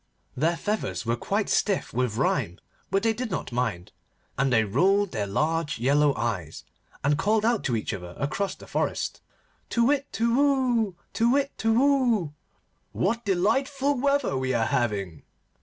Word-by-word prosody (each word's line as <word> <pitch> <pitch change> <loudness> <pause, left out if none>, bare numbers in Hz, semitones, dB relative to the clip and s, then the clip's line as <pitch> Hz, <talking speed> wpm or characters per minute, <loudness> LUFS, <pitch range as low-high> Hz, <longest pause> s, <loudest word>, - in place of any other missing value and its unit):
Their 165 +5 +1
feathers 210 - -2
were 115 +1 +1
quite 200 - -1
stiff 200 -3 0
with 120 -2 -1
rime, 115 - 0 0.3
but 195 - +1
they 225 -1 +3
did 245 +1 -4
not 170 - -4
mind, 115 -8 -2 0.4
and 135 0 +1
they 110 -2 +4
rolled 195 - +2
their 105 -4 -2
large 155 +8 0
yellow 140 +4 +3
eyes, 95 -10 -3 0.4
and 145 +1 +2
called 215 +1 +2
out 230 -2 +1
to 120 - +1
each 110 - -2
other 90 -2 -7
across 190 +8 -2
the - - -13
forest, - - -2 0.5
'Tu 235 - +2
whit! 280 +1 +1
Tu 230 +1 +1
whoo! 255 -8 +2 0.2
Tu 230 +1 +2
whit! 275 +2 +2
Tu 225 - 0
whoo! 240 - +2 0.6
what 230 +5 0
delightful 265 +9 +1
weather 280 - +1
we 130 0 -1
are 115 -1 +2
having! 100 - -1
180 Hz, 160 wpm, -26 LUFS, -, 0.6 s, they